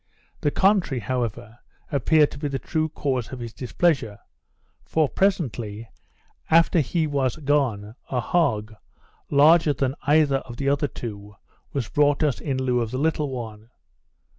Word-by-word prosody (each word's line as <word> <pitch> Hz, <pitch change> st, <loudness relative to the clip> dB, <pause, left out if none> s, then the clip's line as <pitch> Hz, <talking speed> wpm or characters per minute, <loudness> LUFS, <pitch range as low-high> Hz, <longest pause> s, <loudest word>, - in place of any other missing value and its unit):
The 145 Hz, -, +1 dB
contrary, 190 Hz, -6 st, +2 dB
however, 115 Hz, -2 st, -4 dB, 0.3 s
appeared 150 Hz, +2 st, +3 dB
to 140 Hz, -, -9 dB
be 145 Hz, -, -2 dB
the 135 Hz, -1 st, -2 dB
true 155 Hz, +3 st, -2 dB
cause 130 Hz, -6 st, -2 dB
of 130 Hz, -, -6 dB
his 120 Hz, -2 st, -7 dB
displeasure; 125 Hz, -3 st, 0 dB, 0.7 s
for, 155 Hz, -, +1 dB
presently 120 Hz, -, -1 dB, 0.6 s
after 165 Hz, +1 st, +4 dB
he 160 Hz, +3 st, 0 dB
was 140 Hz, -4 st, 0 dB
gone, 135 Hz, -8 st, 0 dB, 0.2 s
a 130 Hz, -, -1 dB
hog, 115 Hz, -7 st, 0 dB, 0.6 s
larger 155 Hz, +2 st, +5 dB
than 135 Hz, -1 st, -1 dB
either 145 Hz, -2 st, +4 dB
of 120 Hz, -3 st, -9 dB
the 140 Hz, +1 st, 0 dB
other 145 Hz, +1 st, +1 dB
two, 105 Hz, -5 st, -8 dB, 0.4 s
was 135 Hz, -6 st, -2 dB
brought 145 Hz, +1 st, +2 dB
us 145 Hz, -5 st, 0 dB
in 135 Hz, -3 st, -2 dB
lieu 125 Hz, -2 st, +1 dB
of 115 Hz, -, -2 dB
the 130 Hz, -, -4 dB
little 150 Hz, 0 st, 0 dB
one. 115 Hz, -3 st, -7 dB
135 Hz, 150 wpm, -24 LUFS, 120-150 Hz, 0.7 s, larger